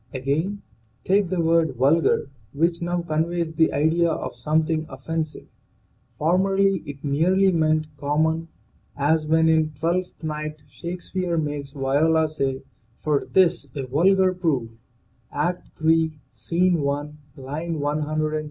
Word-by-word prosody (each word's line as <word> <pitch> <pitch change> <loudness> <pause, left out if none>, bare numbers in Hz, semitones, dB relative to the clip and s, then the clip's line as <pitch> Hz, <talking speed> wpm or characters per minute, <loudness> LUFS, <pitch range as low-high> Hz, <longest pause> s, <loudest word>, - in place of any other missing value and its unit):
Again, 155 +10 -1 0.4
take 195 -1 +2
the 185 -1 -1
word 165 -4 +2
vulgar, 140 +2 +2 0.2
which 170 +3 +1
now 175 0 -1
conveys 165 +1 -1
the 160 0 +3
idea 160 +4 +2
of - - -3
something 155 +1 0
offensive. 155 +4 -4 0.7
Formerly 195 +3 +2
it 140 -1 -8
merely 180 +7 +3
meant 155 -2 +2
common, 160 +3 0 0.5
as 155 +2 +1
when 160 +1 +4
in 160 -1 +2
" 140 - -23
Twelfth 175 +2 -2
Night" 155 -1 -4
Shake 170 +7 -7
speare 180 -2 -2
makes 145 -2 -3
Viola 150 +4 +2
say: 135 -3 -2 0.3
"for 150 -2 0
'tis 185 -3 +2
a 135 -2 -3
vulgar 185 +8 +3
proof 150 -11 -1 0.4
" 120 -1 -39 0.2
(Act 180 0 -7 0.2
III, 160 -1 +3
Scene 175 +1 +1
i, 145 0 -2 0.3
line 155 +5 -4
135). 155 +1 -1
160 Hz, 135 wpm, -23 LUFS, 145-170 Hz, 0.7 s, when